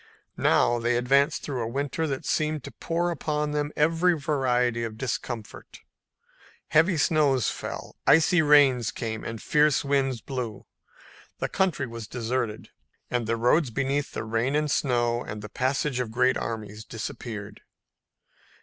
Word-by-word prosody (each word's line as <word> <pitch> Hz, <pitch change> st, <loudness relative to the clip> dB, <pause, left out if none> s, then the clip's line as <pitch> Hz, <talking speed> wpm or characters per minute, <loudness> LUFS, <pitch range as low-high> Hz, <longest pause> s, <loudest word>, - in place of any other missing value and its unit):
Now 120 Hz, -, +3 dB
they 120 Hz, +1 st, +1 dB
advanced 140 Hz, +5 st, +2 dB
through 135 Hz, -4 st, -3 dB
a 115 Hz, -, -2 dB
winter 140 Hz, +6 st, -2 dB
that 135 Hz, -2 st, -4 dB
seemed 155 Hz, -2 st, 0 dB
to -, -, -8 dB
pour 170 Hz, +1 st, -1 dB
upon 150 Hz, -1 st, -2 dB
them 150 Hz, 0 st, -1 dB
every 165 Hz, +3 st, +3 dB
variety 125 Hz, -4 st, +1 dB
of 110 Hz, -1 st, -5 dB
discomfort. 120 Hz, -3 st, -5 dB, 0.9 s
Heavy 160 Hz, +3 st, +4 dB
snows 145 Hz, -5 st, +2 dB
fell, -, -, -7 dB
icy 165 Hz, +2 st, +5 dB
rains 140 Hz, -6 st, +5 dB
came 110 Hz, -2 st, -4 dB
and 115 Hz, -1 st, -5 dB
fierce 150 Hz, +2 st, +2 dB
winds 135 Hz, -3 st, +1 dB
blew. 120 Hz, -3 st, -5 dB, 0.7 s
The -, -, -2 dB
country 185 Hz, -8 st, 0 dB
was 115 Hz, -3 st, -8 dB
deserted, 115 Hz, -2 st, -3 dB, 0.4 s
and 120 Hz, -2 st, -1 dB
the 115 Hz, +1 st, 0 dB
roads 125 Hz, +5 st, +3 dB
beneath 140 Hz, +3 st, -1 dB
the -, -, -3 dB
rain 115 Hz, +5 st, 0 dB
and 150 Hz, -1 st, +1 dB
snow 120 Hz, -3 st, +1 dB
and 105 Hz, 0 st, -7 dB
the 105 Hz, -, -7 dB
passage 135 Hz, +1 st, -1 dB
of 125 Hz, -3 st, -2 dB
great 125 Hz, +3 st, +2 dB
armies 110 Hz, -2 st, -5 dB
disappeared. 105 Hz, -1 st, -7 dB
130 Hz, 145 wpm, -26 LUFS, 115-150 Hz, 0.9 s, icy